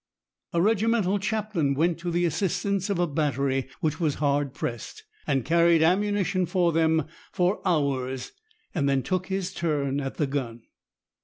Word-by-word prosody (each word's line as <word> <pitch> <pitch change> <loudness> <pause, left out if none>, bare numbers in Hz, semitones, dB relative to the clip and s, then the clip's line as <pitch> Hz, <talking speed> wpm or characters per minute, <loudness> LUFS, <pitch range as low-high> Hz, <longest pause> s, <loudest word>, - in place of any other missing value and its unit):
A 170 - 0
regimental 210 0 +2
chaplain 200 -8 -1
went 165 +3 +1
to 175 +1 -3
the 175 +1 +1
assistance 195 +3 -1
of 200 - 0
a 175 - +2
battery 140 -4 -1
which 155 +1 -1
was 155 -4 +1
hard 145 -1 0
pressed, 120 -4 -5 0.2
and 135 -4 +1
carried 170 -1 +4
ammunition 185 0 +1
for 175 0 +2
them 160 -1 +2 0.3
for 180 +3 +1
hours, 135 -5 -1 0.4
then 140 -5 +1
took 185 +6 -1
his 190 -1 -2
turn 145 -5 -1
at 135 -1 -5
the 150 - +1
gun. 125 -5 -4
165 Hz, 150 wpm, -26 LUFS, 140-185 Hz, 0.4 s, carried